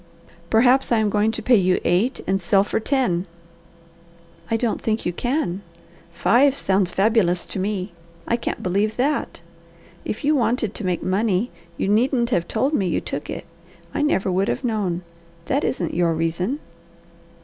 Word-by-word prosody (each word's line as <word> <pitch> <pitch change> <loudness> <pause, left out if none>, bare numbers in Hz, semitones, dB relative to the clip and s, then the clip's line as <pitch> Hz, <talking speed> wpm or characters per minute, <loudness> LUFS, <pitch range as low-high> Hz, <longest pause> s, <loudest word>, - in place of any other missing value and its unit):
"Perhaps 245 +4 +4
I 235 - +4
am 215 -2 +1
going 210 +2 +2
to - - -5
pay 245 -2 +5
you 185 -1 +2
eight 190 +9 +1
and 195 +1 0
sell 195 +2 +3
for 205 - -1
ten." 220 -8 0 1.2
"I 225 - +2
don't 230 -1 -1
think 220 0 -1
you 175 - -1
can. 225 - -1 0.5
Five 255 +10 +3
sounds 190 -2 +1
fabulous 195 -4 +2
to - - -5
me. 195 0 -2 0.4
I 235 - +2
can't 235 - -4
believe 200 +4 0
that. 280 +4 -1 0.6
If - - -4
you 300 +2 +3
wanted 235 -4 0
to - - -6
make 180 -1 -1
money 200 +3 0 0.3
you - - -1
needn't 235 +3 +2
have 175 -6 +1
told 265 +7 0
me 195 -10 +1
you 170 - 0
took - - -5
it. - - -5 0.5
I - - -1
never 200 -10 +1
would 190 +2 +1
have - - -2
known. 200 -7 -1 0.4
That 280 - 0
isn't 175 -10 -1
your 170 -1 +1
reason!" 170 - -1
210 Hz, 170 wpm, -22 LUFS, 185-240 Hz, 1.2 s, pay